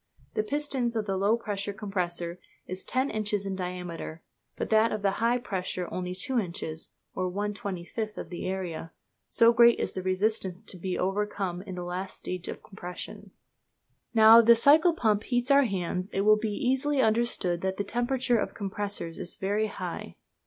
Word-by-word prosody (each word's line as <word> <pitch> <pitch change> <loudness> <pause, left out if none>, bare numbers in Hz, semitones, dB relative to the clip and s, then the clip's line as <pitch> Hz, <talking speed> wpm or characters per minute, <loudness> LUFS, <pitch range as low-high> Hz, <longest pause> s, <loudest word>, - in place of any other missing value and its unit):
The - - +1
pistons 265 -1 -1
of 220 -2 0
the 195 -2 -1
low 200 +4 +3
pressure 205 -3 -3
compressor 180 -3 -3 0.3
is 185 +1 -5
ten 260 +2 0
inches 210 -2 -1
in 195 -1 -2
diameter, 180 -3 -5 0.3
but - - -4
that 220 +1 +5
of 215 -1 -3
the 195 - +3
high 235 +2 +3
pressure 185 -6 -3
only 180 0 -3
two 245 +7 0
inches, 170 -4 -4 0.2
or 185 -1 -2
1/25 205 +1 -4
of - - -7
the 175 - -4
area, 175 -4 -4 0.4
so 230 0 +6
great 235 0 +6
is - - -1
the 185 - -4
resistance 185 0 -1
to 190 - -3
be 180 +1 -3
overcome 195 -2 -1
in 190 -2 -7
the 180 - -5
last 180 +2 -4
stage 180 -1 -5
of - - -6
compression. 180 -3 -8 0.8
Now, 225 0 +9
if 230 - +4
the 235 - +9
cycle 310 +8 +6
pump 215 -8 +2
heats 245 +1 +1
our 280 0 +6
hands, 185 -2 -2
it 195 - -1
will 215 +1 +6
be 220 0 -2
easily 265 +6 +1
understood 220 -7 +2
that 190 0 -1
the 205 - 0
temperature 245 +3 0
of - - -1
the - - -23
compressors 200 -4 -4
is 180 -1 -3
very 205 +3 0
high. 180 - -6
200 Hz, 180 wpm, -28 LUFS, 185-230 Hz, 0.8 s, Now